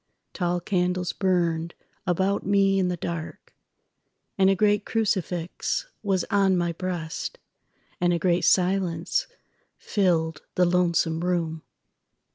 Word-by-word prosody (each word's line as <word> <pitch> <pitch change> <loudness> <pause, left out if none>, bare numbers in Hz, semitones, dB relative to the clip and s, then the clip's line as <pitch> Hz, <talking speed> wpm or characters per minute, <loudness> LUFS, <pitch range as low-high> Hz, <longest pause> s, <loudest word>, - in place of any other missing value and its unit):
Tall 175 -1 0
candles 180 0 -1
burned 170 -3 0 0.3
about 190 +3 +1
me 195 -1 +3
in 185 - +2
the 180 -1 -2
dark, 165 -1 -6 0.8
And 190 -1 +4
a 195 - +4
great 205 +1 +2
crucifix 190 - -1 0.2
was 195 -3 0
on 195 -2 +3
my 170 -1 0
breast, 170 -2 -4 0.6
And 175 0 +2
a 175 - +2
great 175 0 +1
silence 180 - +1 0.5
filled 165 -6 0
the 180 - +4
lonesome 170 -2 +2
room. 165 -3 -1
180 Hz, 115 wpm, -25 LUFS, 170-195 Hz, 0.8 s, And